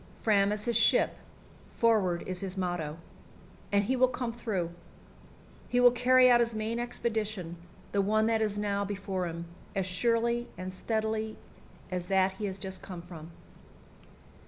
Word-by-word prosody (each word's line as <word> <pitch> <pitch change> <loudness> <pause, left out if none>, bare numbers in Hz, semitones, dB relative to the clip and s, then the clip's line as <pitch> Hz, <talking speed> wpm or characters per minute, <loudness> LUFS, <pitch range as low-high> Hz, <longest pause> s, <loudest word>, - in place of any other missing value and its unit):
Fram 200 -2 +3
is 210 0 -2
his 235 -1 0
ship, 230 - +4 0.5
"forward" 205 -7 +2
is 185 -1 -4
his 195 0 -4
motto, 175 -4 -2 0.7
and 200 0 +3
he 255 +6 0
will 255 0 +5
come 245 -2 -3
through. 205 -8 -2 1.0
He 245 - +2
will 245 0 +8
carry 255 +1 +5
out 240 -1 +6
his 235 -1 +1
main 220 +2 -2
expedition, 215 -7 -2 0.4
the 200 - +2
one 215 +2 +2
that 225 0 +2
is 210 -1 0
now 200 -1 0
before 195 -2 -3
him, 170 0 -5 0.3
as 195 -1 0
surely 235 +5 +1
and 185 +1 -5
steadily 220 +2 -2 0.5
as 180 -1 -3
that 190 0 +3
he 195 +2 -5
has 190 -1 -3
just 190 -1 -5
come 180 -3 -8
from. 165 -3 -10
205 Hz, 160 wpm, -30 LUFS, 185-230 Hz, 1.0 s, will